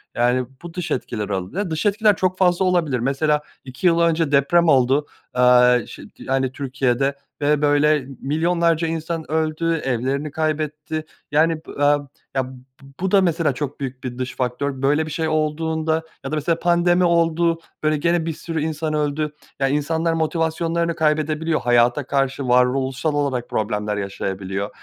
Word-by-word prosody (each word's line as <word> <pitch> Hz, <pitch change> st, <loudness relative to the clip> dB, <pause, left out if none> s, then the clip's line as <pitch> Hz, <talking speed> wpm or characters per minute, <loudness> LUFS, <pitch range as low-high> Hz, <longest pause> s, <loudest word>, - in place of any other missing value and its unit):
Yani, 125 Hz, +1 st, +2 dB, 0.2 s
bu 170 Hz, -1 st, -8 dB
dış 180 Hz, -3 st, -4 dB
etkiler 105 Hz, -4 st, -3 dB
olabi 105 Hz, -, -3 dB
Dış 160 Hz, +7 st, -2 dB
etkiler 210 Hz, 0 st, +3 dB
çok 185 Hz, 0 st, 0 dB
fazla 180 Hz, 0 st, +3 dB
olabilir 165 Hz, -9 st, +1 dB
mesela 150 Hz, +4 st, +1 dB, 0.2 s
2 130 Hz, +7 st, -1 dB
yıl 170 Hz, 0 st, +4 dB
önce 165 Hz, -2 st, +2 dB
deprem 145 Hz, +5 st, +4 dB
oldu, 135 Hz, 0 st, +3 dB, 0.3 s
aaa, 125 Hz, -1 st, +5 dB
ş -, -, -11 dB
t -, -, -15 dB
yani, 135 Hz, -1 st, 0 dB
Türkiye'de 135 Hz, 0 st, -1 dB, 0.3 s
ve, 145 Hz, 0 st, +2 dB
böyle, 145 Hz, -1 st, +3 dB
milyonlarca 165 Hz, +3 st, +1 dB
insan 160 Hz, 0 st, -4 dB
öldü, 160 Hz, +1 st, 0 dB
evlerini 135 Hz, +4 st, -1 dB
kaybetti, 155 Hz, 0 st, -2 dB, 0.3 s
yani, 160 Hz, +3 st, +3 dB
b 155 Hz, -, -12 dB
aaa, 145 Hz, 0 st, +3 dB, 0.3 s
ya, 130 Hz, -1 st, 0 dB
b -, -, -11 dB, 0.4 s
bu 190 Hz, 0 st, -1 dB
da 200 Hz, -1 st, +5 dB
mesela 165 Hz, -5 st, +1 dB
çok 145 Hz, +2 st, -5 dB
büyük 130 Hz, -2 st, -6 dB
bir 125 Hz, -1 st, -5 dB
dış 130 Hz, 0 st, -4 dB
faktör. 130 Hz, +2 st, -2 dB
Böyle 145 Hz, +3 st, +2 dB
bir 155 Hz, -, -7 dB
şey 160 Hz, +1 st, -1 dB
olduğunda 160 Hz, +1 st, 0 dB, 0.2 s
ya 135 Hz, -, -5 dB
da 155 Hz, -, 0 dB
mesela 165 Hz, +2 st, 0 dB
pandemi 175 Hz, +1 st, +3 dB
oldu, 170 Hz, -1 st, +2 dB, 0.2 s
böyle, 155 Hz, 0 st, +2 dB
gene 170 Hz, +1 st, +1 dB
bir 165 Hz, -, -2 dB
sürü 165 Hz, 0 st, -4 dB
insan 155 Hz, 0 st, -2 dB
öldü. 150 Hz, 0 st, -1 dB, 0.3 s
Ya, 135 Hz, -, +2 dB
insanlar 160 Hz, +4 st, 0 dB
motivasyonlarını 165 Hz, +1 st, 0 dB
kaybedebiliyor, 155 Hz, 0 st, 0 dB
hayata 120 Hz, +3 st, +3 dB
karşı 135 Hz, -1 st, 0 dB
varoluşsal 130 Hz, +4 st, +2 dB
olarak 140 Hz, -4 st, -1 dB
problemler 105 Hz, -1 st, -1 dB
yaşayabiliyor. 100 Hz, 0 st, -3 dB
150 Hz, 160 wpm, -21 LUFS, 130-165 Hz, 0.4 s, aaa